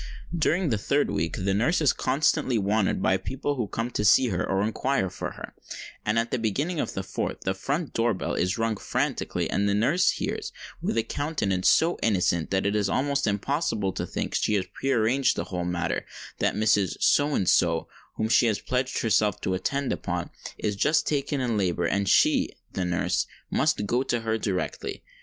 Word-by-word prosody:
During 170 +1 +1
the 110 -4 0
third 140 +7 +1
week, 80 +2 -1
the 95 +1 0
nurse 120 - +2
is 150 -5 +3
constantly 130 -2 +1
wanted 100 -1 +1
by 95 - +3
people 135 +8 -3
who 120 -6 -2
come 115 +5 -3
to 105 - -1
see 120 +5 +5
her, 90 - -1
or 95 0 0
inquire 110 -2 0
for - - -5
her; - - -9 0.5
and 105 +2 0
at 115 0 0
the - - 0
beginning 145 - -1
of - - -2
the 95 - -2
fourth 95 0 -4
the 95 - -1
front 140 - -3
door 115 -2 +1
bell - - -3
is 90 +1 0
rung 115 -1 0
frantically, - - -2
and 100 0 0
the 100 - +2
nurse 140 - +3
hears, - - -2 0.3
with - - -1
a 115 - +2
countenance 105 - 0
so 165 +2 +3
innocent 90 -6 +1
that 95 0 0
it 100 +1 +1
is 100 -2 +1
almost 140 +2 0
impossible 105 - -1
to - - -4
think - - -4
she 105 - +1
has 95 -2 0
pre 135 - -3
arranged 125 +3 +2
the - - -2
whole 90 -2 -4
matter, 90 -1 -2 0.3
that - - +1
Mrs. 105 -4 +2
So 145 0 +3
and 95 - 0
so, 85 -2 +3 0.3
whom 110 - -1
she 120 +1 +4
has 110 -3 +1
pledged 125 0 -1
herself 105 -3 +2
to 95 - -1
attend 140 +9 -1
upon, - - -4 0.3
is 105 -1 -2
just 150 +10 +2
taken 145 -1 -1
in 120 -4 0
labour, 90 -3 0
and 100 +2 0
she - - +4 0.2
(the 90 - -1
nurse) 90 0 0 0.2
must 105 - +1
go 120 +5 +1
to 120 -3 -1
her 110 0 -1
directly. 110 - -3
110 Hz, 200 wpm, -26 LUFS, 95-135 Hz, 0.5 s, see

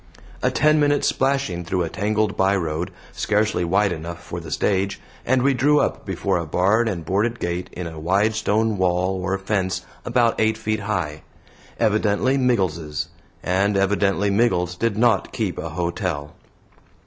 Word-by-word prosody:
A - - +2
ten 155 0 +3
minutes 145 -1 +2
splashing 135 -10 0
through 90 +1 -1
a 85 - -3
tangled 105 +2 0
by 95 +1 +3
road, 85 -2 -2 0.2
scarcely 105 -3 0
wide 100 +3 +2
enough 85 0 -5
for 85 - -6
the 80 -2 -9
stage, 95 +5 0 0.3
and 130 0 +3
we 140 0 +4
drew 145 +4 +3
up - - -1
before - - 0
a 85 - -3
barred 100 +8 +2
and 85 -6 -4
boarded 105 +7 0
gate 85 +1 -3
in 90 - -5
a 80 -1 -7
wide 100 +7 +2
stone 110 -1 0
wall 90 +1 +1
or 95 +2 -1
fence 95 -2 -2 0.2
about 120 -2 +2
eight 110 0 +2
feet 110 -1 -2
high. 90 -8 -3 0.6
Evidently 110 +3 +2
Miggles's, 90 - 0 0.3
and 100 +2 +1
evidently 100 0 +2
Miggles 100 -5 +1
did 115 +2 -1
not 115 -3 +2
keep - - -2
a 85 - -4
hotel. 85 -2 -3
100 Hz, 160 wpm, -22 LUFS, 90-110 Hz, 0.6 s, we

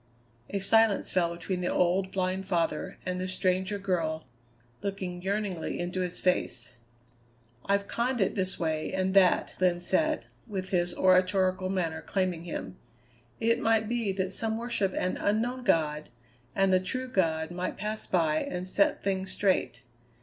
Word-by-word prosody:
'" 115 +1 -35
A 200 - -2
silence 220 +1 +4
fell 175 -2 +2
between 180 +1 -3
the 180 - 0
old, 185 +2 +2
blind 190 0 -1
father 165 -4 -1
and 180 0 -2
the 185 - -2
stranger 185 +2 0
girl 165 -5 -1 0.6
looking 190 -3 -4
yearningly 195 -3 -2
into 180 +1 -2
his 180 -1 -2
face. 125 -10 0 0.9
"I've 200 0 +1
conned 245 +1 -1
it 195 - +2
this 190 -1 -1
way 155 -2 -1
and 190 0 0
that," 190 -2 +4
Glenn 180 -1 +3
said, 310 - +1 0.2
with 190 -3 -4
his 175 -1 +1
oratorical 185 0 +3
manner 170 -4 -1
claiming 185 -3 -1
him. 95 - -5 0.6
"It 230 0 +2
might 225 -1 +2
be 230 -3 0
that 190 0 -2
some 220 +1 0
worship 230 -5 -1
an 185 - -1
Unknown 240 +5 0
God 150 -7 +1 0.5
and 195 -1 +3
the 185 - +5
true 255 +8 -3
God 165 -7 0
might 180 +1 -3
pass 215 +2 -4
by 160 -4 +2
and 180 +3 -3
set 200 +2 +2
things 190 -1 -1
straight. 185 -10 0
185 Hz, 155 wpm, -29 LUFS, 175-200 Hz, 0.9 s, the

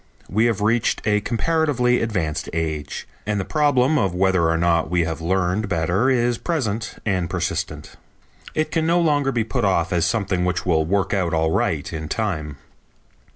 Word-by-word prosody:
We 110 +4 +1
have 115 -4 0
reached 115 +2 +1
a 105 -1 +2
comparatively 125 0 +1
advanced 95 -9 -2
age, 80 -3 -3 0.2
and 105 -1 0
the 95 - -2
problem 145 -1 +2
of 95 -5 0
whether 90 -3 +2
or 80 - +1
not 85 -1 +2
we 90 0 +2
have 80 0 -4
learned 95 +4 0
better 90 +7 +1
is 120 -2 +1
present 115 - -2
and 90 -5 0
persistent. 90 +1 -3 0.6
It 155 0 0
can 160 -1 0
no 170 +1 +3
longer 145 -5 +2
be 120 -3 0
put 120 +2 -2
off 95 -4 +1
as 85 -2 +2
something 100 -5 0
which 90 0 -1
will 80 -3 +2
work 95 0 0
out 90 -4 0
all 80 0 +1
right - - -1
in 80 -1 -5
time. 80 -10 -2
100 Hz, 175 wpm, -22 LUFS, 85-120 Hz, 0.6 s, no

